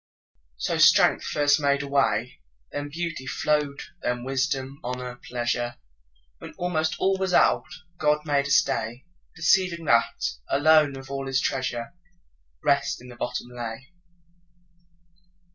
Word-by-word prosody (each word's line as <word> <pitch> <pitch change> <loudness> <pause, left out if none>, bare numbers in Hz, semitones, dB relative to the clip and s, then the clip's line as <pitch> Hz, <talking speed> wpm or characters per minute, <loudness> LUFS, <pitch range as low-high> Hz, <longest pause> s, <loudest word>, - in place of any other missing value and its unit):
So - - -1
strength - - +6
first 145 0 +2
made 140 -1 +1
a - - -6
way, 135 -4 0 0.3
Then 145 0 -4
beauty 165 -4 -4
flow'd, 150 -1 0 0.2
then 120 0 -2
wisdom, 135 +1 -2
honour, 125 0 -5
pleasure; 120 0 -1 0.6
When - - -10
almost 160 -3 0
all 190 0 +1
was 190 -2 0
out, - - +4 0.3
God 150 0 +2
made 140 -2 +1
a - - -6
stay, 120 -1 +1 0.3
Perceiving 170 0 +2
that, 115 -4 +2 0.2
alone 145 -1 +4
of 135 +1 -10
all 135 0 -4
His 135 0 +1
treasure, 130 -2 -2 0.7
Rest 140 0 +1
in 125 +1 -13
the 120 - -11
bottom 120 0 -4
lay. 120 +3 -7
140 Hz, 130 wpm, -25 LUFS, 125-150 Hz, 0.7 s, strength